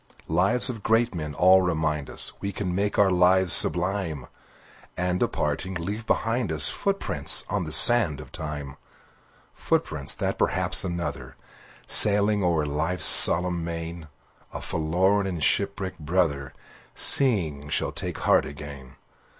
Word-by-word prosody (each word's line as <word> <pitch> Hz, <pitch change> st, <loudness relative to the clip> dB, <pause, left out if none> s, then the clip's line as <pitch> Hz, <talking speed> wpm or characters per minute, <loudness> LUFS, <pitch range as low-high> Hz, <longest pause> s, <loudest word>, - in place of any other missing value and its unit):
Lives 90 Hz, -, +1 dB
of 120 Hz, -5 st, -6 dB
great 115 Hz, +2 st, 0 dB
men 75 Hz, -4 st, -7 dB
all 95 Hz, +1 st, +4 dB
remind 80 Hz, -5 st, -3 dB
us -, -, -2 dB
We 100 Hz, -, -4 dB
can 95 Hz, -2 st, -5 dB
make 100 Hz, +2 st, -2 dB
our 100 Hz, -2 st, +3 dB
lives 90 Hz, 0 st, +2 dB
sublime, 90 Hz, -6 st, 0 dB, 0.7 s
And 90 Hz, 0 st, -2 dB
departing, 95 Hz, 0 st, -3 dB
leave 100 Hz, +6 st, -6 dB
behind 115 Hz, -4 st, -2 dB
us 75 Hz, -1 st, +2 dB
Footprints 195 Hz, 0 st, +1 dB
on 100 Hz, -3 st, -2 dB
the 80 Hz, -, -8 dB
sands 105 Hz, -, +6 dB
of -, -, -13 dB
time; 75 Hz, -3 st, -8 dB, 0.8 s
Footprints, 70 Hz, -, -3 dB
that -, -, -4 dB
perhaps -, -, +2 dB
another, 85 Hz, -7 st, -6 dB, 0.5 s
Sailing 105 Hz, 0 st, +3 dB
o'er 85 Hz, -4 st, 0 dB
life's 80 Hz, +4 st, -2 dB
solemn 90 Hz, 0 st, +3 dB
main, 85 Hz, -1 st, -7 dB, 0.4 s
A -, -, -7 dB
forlorn 95 Hz, +6 st, -1 dB
and 85 Hz, -5 st, -5 dB
shipwrecked 100 Hz, -2 st, -2 dB
brother, 75 Hz, -4 st, -2 dB, 0.4 s
Seeing, 80 Hz, -, +3 dB
shall -, -, -2 dB
take -, -, -5 dB
heart -, -, +1 dB
again. 70 Hz, -2 st, -11 dB
90 Hz, 135 wpm, -24 LUFS, 75-100 Hz, 0.8 s, sands